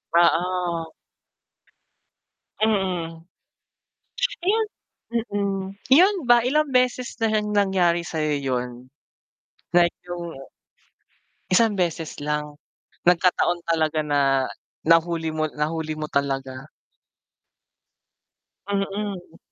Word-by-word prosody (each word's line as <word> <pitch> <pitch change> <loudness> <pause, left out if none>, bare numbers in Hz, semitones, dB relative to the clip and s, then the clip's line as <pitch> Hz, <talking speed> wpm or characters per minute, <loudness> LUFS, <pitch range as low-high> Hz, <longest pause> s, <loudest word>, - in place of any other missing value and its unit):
Oo. 175 0 +2 1.8
Mm. 180 -6 -1 1.2
Ayan 430 +5 +2 0.7
mm. 200 -1 -1 0.3
'Yan 370 +8 +6
ba, 240 0 +6
ilang 295 +5 +1
beses 250 -1 +1
na 225 - +3
'yan 210 -1 0
nangyari 185 -4 +2
sa 165 -1 -6
'yo 155 -1 +1
yun? 125 -1 -3 0.9
Like 175 -1 +4
yung 170 -4 -6 1.1
isang 220 +3 +4
beses 170 -5 -2
lang? 150 0 -3 0.5
Nagkataon 175 -1 +2
talaga 160 -2 +1
na 135 -2 +2 0.4
nahuli 165 -1 +3
mo, 155 0 -1
nahuli 155 +1 -3
mo 155 - -3
talaga. 135 -1 -2 2.0
Mm. 195 -3 -3
170 Hz, 85 wpm, -24 LUFS, 155-200 Hz, 2.0 s, Yan